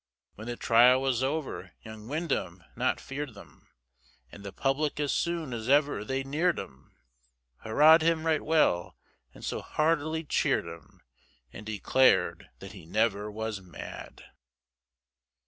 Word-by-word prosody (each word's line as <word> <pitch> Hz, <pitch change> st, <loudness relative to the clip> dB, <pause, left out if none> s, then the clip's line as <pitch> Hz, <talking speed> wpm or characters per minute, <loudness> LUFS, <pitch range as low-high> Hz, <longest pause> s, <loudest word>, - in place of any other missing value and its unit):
When 110 Hz, +2 st, -10 dB
the 120 Hz, -, -3 dB
trial 120 Hz, +3 st, +5 dB
was 130 Hz, -2 st, 0 dB
over, 140 Hz, +2 st, -3 dB
young 110 Hz, -1 st, -10 dB
Windham 125 Hz, -, -3 dB
not 125 Hz, +2 st, 0 dB
fear'd 135 Hz, -3 st, -6 dB
them, 100 Hz, -, -16 dB, 0.6 s
And 100 Hz, -, -12 dB
the 100 Hz, -, -7 dB
public 145 Hz, +5 st, -1 dB
as 145 Hz, -2 st, 0 dB
soon 170 Hz, -6 st, -2 dB
as 115 Hz, +1 st, -5 dB
ever 145 Hz, -6 st, +3 dB
they 135 Hz, +4 st, -2 dB
near'd 160 Hz, +6 st, 0 dB
him, 65 Hz, 0 st, -10 dB, 0.6 s
Hurrah'd 150 Hz, +9 st, +5 dB
him 165 Hz, 0 st, +1 dB
right 160 Hz, -2 st, +2 dB
well, 150 Hz, -, +1 dB, 0.3 s
and -, -, -11 dB
so -, -, -3 dB
heartily 160 Hz, 0 st, 0 dB
cheer'd 150 Hz, -, 0 dB
him, -, -, -12 dB, 0.5 s
And 105 Hz, -, -10 dB
declar'd 110 Hz, +5 st, +2 dB
that 95 Hz, -, -10 dB
he 95 Hz, -6 st, -13 dB
never 105 Hz, +1 st, 0 dB
was 110 Hz, -1 st, -5 dB
mad. 90 Hz, -3 st, -10 dB
130 Hz, 140 wpm, -28 LUFS, 110-155 Hz, 0.6 s, trial